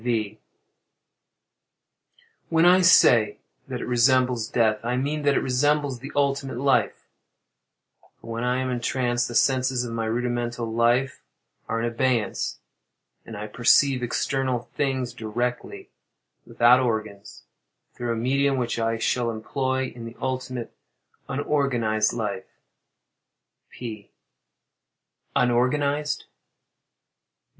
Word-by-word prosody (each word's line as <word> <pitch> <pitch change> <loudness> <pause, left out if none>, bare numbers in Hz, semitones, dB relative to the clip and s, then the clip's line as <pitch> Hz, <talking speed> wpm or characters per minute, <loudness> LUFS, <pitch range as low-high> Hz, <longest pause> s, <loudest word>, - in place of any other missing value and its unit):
V. 110 -3 -2 2.1
When 165 +1 +3
I 180 +1 +6
say 115 - +5 0.3
that - - -5
it - - -4
resembles 125 -1 +2
death, 110 -2 +1
I 120 +2 -1
mean 145 +4 -1
that 145 -1 +2
it - - +2
resembles 140 0 +1
the 140 +3 -8
ultimate 140 -2 0
life; 135 0 +1 1.1
for 115 - -10
when 115 +1 -3
I 125 +1 +1
am 130 0 -2
entranced 120 0 -1
the 120 - -7
senses 130 -1 +2
of 120 -1 -5
my 115 -1 -2
rudimental 120 0 -2
life 120 +4 +1 0.5
are 115 - -1
in 115 - -1
abeyance, 120 -1 -1 0.7
and 110 - -8
I 105 - -5
perceive 125 +4 +3
external 130 0 -2
things 130 -4 -1
directly, 120 +2 -4 0.6
without 120 +2 +5
organs, 110 -4 -4 0.5
through 120 -1 -3
a - - -1
medium 135 +4 +1
which 120 -2 -2
I 115 0 0
shall 120 +1 0
employ 130 +3 -2
in 115 -1 -8
the 115 +1 -10
ultimate, 130 -2 -4 0.5
unorganized 130 -6 0
life. 105 -5 -4 1.2
P. 110 -4 -8 1.3
Unorganized? 140 +4 +1
125 Hz, 115 wpm, -24 LUFS, 115-130 Hz, 2.1 s, I